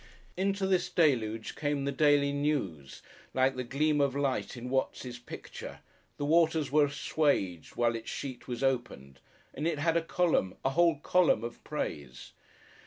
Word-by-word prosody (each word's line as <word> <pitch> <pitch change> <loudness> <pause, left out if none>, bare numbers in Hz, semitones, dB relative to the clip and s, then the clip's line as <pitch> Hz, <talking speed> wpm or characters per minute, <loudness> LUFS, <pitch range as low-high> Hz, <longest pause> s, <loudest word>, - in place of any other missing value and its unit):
Into 195 +1 0
this 185 -2 +1
deluge 115 -9 +1
came 145 -2 -1
the 140 - 0
Daily 145 0 +3
News, 135 - -2 0.3
like 130 0 +3
the 130 - -3
gleam 145 +4 +1
of 140 -1 +1
light 130 -6 -1
in 125 +1 -6
Watts' 125 -2 -2
picture, 120 - -9 0.4
the 145 - -2
waters 160 -2 +3
were 150 0 +5
assuaged 140 - -1
while 120 -1 +2
its 115 - -6
sheet 130 -3 -6
was 125 0 -4
opened, 120 - -2 0.3
and 150 +4 -2
it 165 -3 0
had 165 +3 +1
a 170 - +3
column, 165 - +1
a 135 - +3
whole 170 +1 +3
column, 175 -12 +3
of 120 - -7
praise. 65 -3 -5
140 Hz, 160 wpm, -30 LUFS, 120-155 Hz, 0.4 s, were